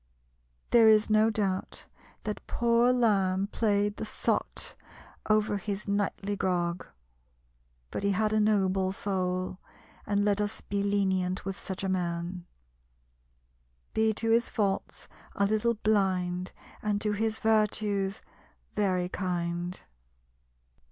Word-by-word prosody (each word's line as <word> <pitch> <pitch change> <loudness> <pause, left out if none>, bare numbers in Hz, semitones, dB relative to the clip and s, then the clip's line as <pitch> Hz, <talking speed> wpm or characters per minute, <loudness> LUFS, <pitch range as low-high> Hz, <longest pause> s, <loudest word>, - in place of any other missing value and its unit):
There 230 -2 +7
is 215 0 +4
no 215 +1 +5
doubt 195 -4 -2 0.4
that 210 -1 -4
poor 235 +1 +3
Lamb 195 -6 +2
played 205 -2 +1
the - - -4
sot 215 - -2 0.6
over 215 -1 +2
his 200 +1 -4
nightly 200 0 -1
grog; 175 -2 -1 1.0
but - - -3
he 200 - +1
had 215 +2 +1
a 215 - +3
noble 190 -3 +2
soul, 185 -2 -2 0.5
and 205 0 +1
let 205 0 +2
us 205 0 -2
be 200 0 -2
lenient 190 -2 0
with 195 -1 -3
such 190 -1 -6
a - - 0
man 175 -1 -2 1.5
"Be 220 0 +3
to 225 +1 0
his 230 +1 +3
faults 200 -3 -2 0.3
a 200 - +2
little 215 +3 +1
blind, 185 -4 0 0.3
And 210 -1 0
to 210 - +1
his 220 +1 -1
virtues 210 -2 +1 0.5
very 185 -4 +1
kind." 175 -1 -3
200 Hz, 120 wpm, -29 LUFS, 185-215 Hz, 1.5 s, There